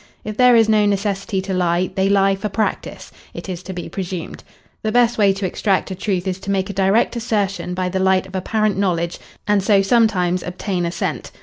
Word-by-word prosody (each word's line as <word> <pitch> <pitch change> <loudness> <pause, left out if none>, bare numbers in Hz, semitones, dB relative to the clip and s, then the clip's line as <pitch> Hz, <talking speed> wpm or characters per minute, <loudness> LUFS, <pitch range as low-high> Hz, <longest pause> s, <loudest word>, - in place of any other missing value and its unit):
If 215 0 -5
there 250 +1 +5
is 225 -1 +5
no 215 -1 +3
necessity 200 -1 -1
to 190 0 -4
lie, 180 0 0
they 190 0 +1
lie 195 0 +3
for 195 +2 -3
practice, 215 +2 -3 0.2
it - - -7
is 180 -2 -5
to 190 - -8
be 175 -2 -6
presumed. 180 -3 -6 0.4
The 215 - -1
best 240 0 +3
way 200 -2 +5
to 195 0 -4
extract 195 +1 0
a - - -3
truth 190 -1 -2
is 185 0 -2
to 195 - -8
make 195 0 0
a - - -8
direct 195 +6 +2
assertion 205 -6 -2
by 185 0 -1
the 190 +1 -2
light 190 0 +2
of 190 - -14
apparent 210 +1 0
knowledge 170 -3 -1 0.3
and 205 -1 +3
so 195 0 +3
sometimes 195 -5 +2
obtain 180 0 -3
assent. 170 - -4
195 Hz, 210 wpm, -20 LUFS, 185-210 Hz, 0.4 s, there